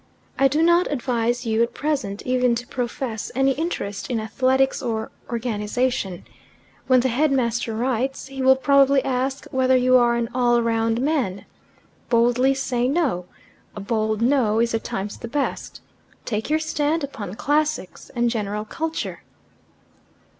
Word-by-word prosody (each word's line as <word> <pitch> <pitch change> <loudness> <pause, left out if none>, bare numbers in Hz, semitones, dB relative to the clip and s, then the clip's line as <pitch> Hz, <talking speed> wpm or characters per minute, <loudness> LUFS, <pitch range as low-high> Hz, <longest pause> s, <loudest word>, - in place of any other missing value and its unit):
"I 270 - +6
do 300 +4 +1
not 345 +1 +3
advise 245 -2 -1
you 225 0 +1
at 235 +1 0
present 270 -10 -2
even 250 -1 +2
to 240 +1 -4
profess 245 -2 -4
any 270 +1 +3
interest 270 - -3
in 240 -3 0
athletics 260 +4 +1
or 225 -2 -3 0.2
organization. 225 -4 -2 0.6
When 255 -1 +5
the 260 - +1
headmaster 240 -4 0
writes, 255 +3 -1
he 270 0 -7
will 265 0 +6
probably 275 0 +4
ask 265 +1 -1
whether 260 0 +3
you 255 0 +5
are 240 -1 +3
an 235 -1 -1
all 240 -1 +3
round 230 0 +1
man. 260 -10 -1 0.6
Boldly 245 +3 +3
say 250 -2 0
no. 265 - 0 0.5
A - - -6
bold 215 +1 -1
'no' 240 -4 +2
is 235 0 +1
at 225 - -1
times 200 +2 -4
the - - -6
best. 280 +4 -3 0.4
Take 220 +1 -3
your 310 - +3
stand 315 0 -1
upon 210 -9 -6
classics 295 -6 -1
and 240 0 +2
general 210 -2 -3
culture." 320 +8 -4
250 Hz, 145 wpm, -23 LUFS, 225-270 Hz, 0.6 s, I